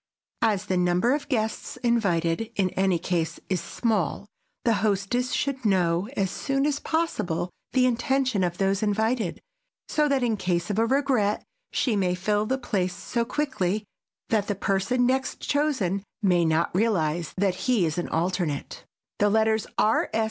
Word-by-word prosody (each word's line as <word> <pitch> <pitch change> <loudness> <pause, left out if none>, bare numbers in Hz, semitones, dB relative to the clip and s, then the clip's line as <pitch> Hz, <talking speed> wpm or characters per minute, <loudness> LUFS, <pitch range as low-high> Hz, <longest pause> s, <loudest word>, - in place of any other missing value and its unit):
As 215 -4 +2
the 185 - 0
number 180 +7 +2
of 290 0 -3
guests 220 -2 -2
invited 200 -4 +1
in 190 -3 +1
any 190 -1 +2
case 165 -1 -2
is 185 -3 0
small, 205 - -1 0.4
the 230 - +4
hostess 215 +4 0
should 270 -2 -1
know 185 -1 +2
as 190 -2 +1
soon 275 0 -1
as 290 -1 0
possible 185 - -1 0.2
the 255 -1 +4
intention 255 -3 +1
of 175 -1 -1
those 195 0 +1
invited, 220 -1 0 0.5
so 300 -1 +2
that, 275 -2 +2
in 230 -3 +1
case 180 0 -1
of 205 - 0
a 230 - +3
regret, 260 -6 +1 0.3
she 240 -5 +1
may 185 -3 +1
fill 210 +3 0
the 265 - +1
place 185 -8 -1
so 235 +5 -2
quickly 225 -7 -1 0.5
that 215 -3 +1
the 205 - -1
person 200 +6 +1
next 265 +1 0
chosen 270 - 0 0.2
may 180 -3 +4
not 160 +1 +1
realize 175 -6 0
that 195 -1 +2 0.2
he 225 -8 +4
is 160 +2 -1
an 175 - -3
alternate. 170 -3 -2 0.4
The 205 - +4
letters 220 0 +2
R. 215 - +3
205 Hz, 160 wpm, -26 LUFS, 180-245 Hz, 0.5 s, the